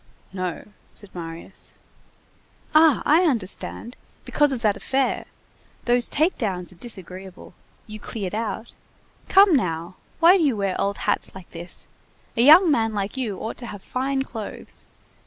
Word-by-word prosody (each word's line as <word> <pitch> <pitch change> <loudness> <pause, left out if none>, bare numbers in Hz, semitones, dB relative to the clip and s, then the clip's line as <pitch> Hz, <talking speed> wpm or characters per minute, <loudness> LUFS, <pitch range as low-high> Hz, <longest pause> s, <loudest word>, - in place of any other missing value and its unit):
"No," 185 0 -4 0.2
said 205 -2 -7
Marius. 165 +2 -8 1.0
"Ah! 310 -1 +6
I 315 +4 +5
understand. 235 - -3 0.3
Because 295 -1 +2
of 255 -3 -3
that 210 -2 +3
affair. 265 +5 0 0.6
Those 240 0 +3
take 315 +5 +1
downs 185 -7 -2
are - - -14
disagreeable. 190 -3 -9 0.3
You 215 0 -9
cleared 205 -3 -5
out. 220 +1 -3 0.6
Come 390 -3 +7
now! 170 - -2 0.2
Why 345 +3 +7
do 345 - +1
you 270 -7 +2
wear 195 -2 0
old 200 0 0
hats - - -1
like 190 -2 -12
this! 170 +1 -7 0.5
A 230 - +2
young 315 +6 +8
man 225 -5 +1
like 200 +3 -2
you 230 -7 -2
ought 220 - -5
to 240 - -6
have 205 -3 -8
fine 265 +1 -1
clothes. 225 -5 -8
220 Hz, 150 wpm, -24 LUFS, 190-270 Hz, 1.0 s, young